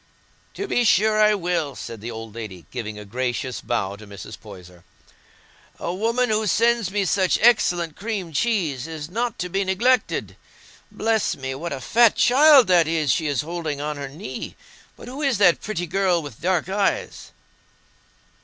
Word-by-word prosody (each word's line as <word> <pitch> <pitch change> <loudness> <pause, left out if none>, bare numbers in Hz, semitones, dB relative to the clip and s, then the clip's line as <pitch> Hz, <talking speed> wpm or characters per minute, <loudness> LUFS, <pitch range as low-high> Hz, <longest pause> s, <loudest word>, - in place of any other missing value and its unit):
"To 400 - -4
be 245 - +1
sure 215 0 +3
I 210 0 +5
will," 175 -7 -2
said 115 -4 -8
the 115 - -6
old 115 -2 -8
lady, 105 -7 -8
giving 110 -4 -5
a 105 - -9
gracious 125 +3 -3
bow 100 -4 -2
to 105 0 -13
Mrs. 100 -2 -9
Poyser. 90 -1 -14 0.9
"A 170 - -4
woman 230 +5 0
who 215 0 +1
sends 230 0 +2
me 200 0 -1
such 185 0 +2
excellent 175 -8 +3
cream 200 -6 -4
cheese 160 - 0
is 160 -1 -7
not 235 +3 -2
to 180 - -3
be 195 +3 -1
neglected. 225 +6 0 0.5
Bless 220 -4 0
me! 130 0 -5
What 165 +6 -5
a 135 - -4
fat 230 - +4
child 275 +1 +6
that 175 -3 +4
is 155 -4 +1
she 155 +5 0
is 140 -3 0
holding 160 -2 -4
on 150 0 -3
her 140 -1 -6
knee! 160 +10 -7 0.4
But - - -12
who 265 +4 -7
is 275 -6 +1
that 180 -4 +4
pretty 200 -5 -3
girl 180 -1 +1
with 140 -7 -10
dark 180 -1 0
eyes?" 195 +1 -2
175 Hz, 170 wpm, -23 LUFS, 135-215 Hz, 0.9 s, child